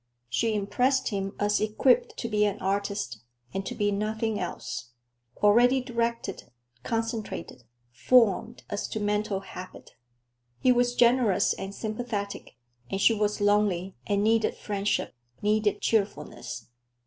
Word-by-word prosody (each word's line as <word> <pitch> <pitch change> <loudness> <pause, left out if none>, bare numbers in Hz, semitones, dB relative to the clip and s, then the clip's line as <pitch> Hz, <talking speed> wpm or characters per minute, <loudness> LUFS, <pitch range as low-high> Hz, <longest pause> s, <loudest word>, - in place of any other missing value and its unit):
She 225 - +1
impressed 255 +6 +1
him 195 -1 -3
as 205 0 +2
equipped 275 - +2
to 235 - -3
be 210 -2 +2
an 205 -1 +1
artist, 195 - -2 0.3
and 195 - -2
to - - -4
be 205 0 +1
nothing 215 +1 -1
else; 125 -8 -5 0.5
already 240 +5 +6
directed, 235 -5 -2 0.4
concentrated, 225 - -4 0.3
formed 225 - +3
as 205 - -2
to 220 - -4
mental 210 -1 0
habit. 185 -1 -10 0.7
He 255 - +4
was 245 0 +2
generous 240 -5 +4
and 195 +1 -6
sympathetic, 215 - -4 0.3
and 195 - -2
she 225 - +5
was 210 0 0
lonely 205 -3 +2
and 200 -1 +1
needed 220 0 +2
friendship; 205 -6 -1 0.3
needed 210 -1 +2
cheerfulness. 195 - -2
210 Hz, 125 wpm, -27 LUFS, 200-230 Hz, 0.7 s, already